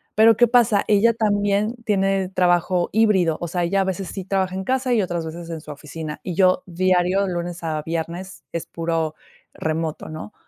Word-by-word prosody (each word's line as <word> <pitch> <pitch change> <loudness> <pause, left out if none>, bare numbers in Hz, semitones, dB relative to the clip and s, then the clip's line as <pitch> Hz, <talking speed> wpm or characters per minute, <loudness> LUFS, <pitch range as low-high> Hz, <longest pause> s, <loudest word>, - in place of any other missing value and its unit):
Pero, 220 +1 +6
¿qué 240 - +6
pasa? 230 -4 +4
Ella 215 +3 +4
también 205 0 +1
tiene 195 -2 +1
trabajo 175 -1 +2
híbrido, 195 -7 +3
o 170 - -2
sea, 175 +1 -1
ella, 195 +3 +1
a - - +3
veces, 190 0 -3
sí 195 - -5
trabaja 190 -1 0
en 190 - -3
casa 255 0 +1
y 225 - +3
otras 175 -3 -2
veces 165 +1 -7
en 160 -2 -5
su 150 - -9
oficina, 150 +1 -7
y 180 -3 -4
yo 185 -1 +3
diario, 185 +2 +2
de 185 - -3
lunes 175 0 -4
a 155 -2 -2
viernes, 170 +4 -5
es 170 - -4
puro 165 -2 -2 0.4
remoto, 160 0 -3
¿no? 155 +6 -8
185 Hz, 195 wpm, -22 LUFS, 165-200 Hz, 0.4 s, Pero